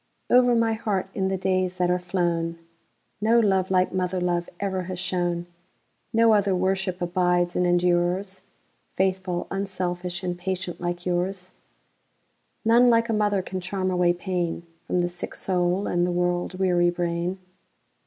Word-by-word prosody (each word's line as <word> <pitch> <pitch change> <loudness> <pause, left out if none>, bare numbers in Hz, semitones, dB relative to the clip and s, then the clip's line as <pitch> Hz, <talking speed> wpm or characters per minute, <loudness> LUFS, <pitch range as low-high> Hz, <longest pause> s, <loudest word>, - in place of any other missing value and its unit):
Over 245 -1 +5
my 230 -1 +2
heart, 200 -4 -2
in 190 -1 0
the 190 0 -1
days 185 -1 0
that 180 -1 +2
are 180 - +1
flown, 175 -2 -1 0.6
No 225 +2 +4
love 190 -4 +2
like 185 -1 +2
mother 185 0 -1
love 175 -1 -1
ever 190 -2 -2
has 185 0 -5
shone; 175 -1 -1 0.7
No 225 0 +5
other 200 -2 +3
worship 185 0 -1
abides 175 0 +1
and 180 - +2
endures,—Faithful, 180 +1 -1
unselfish, 180 -2 -3
and 180 -1 -2
patient 185 -1 -4
like 175 0 -3
yours:None 190 +5 -2
like 230 0 +3
a - - +1
mother 205 -3 +1
can 185 0 -5
charm 185 +1 -2
away 180 -1 +3
painFrom 175 -1 -2 0.4
the 175 - +1
sick 175 0 -6
soul 180 +1 0
and 175 0 +1
the - - -1
world 175 +1 -1
weary 175 -2 +3
brain. 175 +1 -2
185 Hz, 145 wpm, -25 LUFS, 175-190 Hz, 0.7 s, Over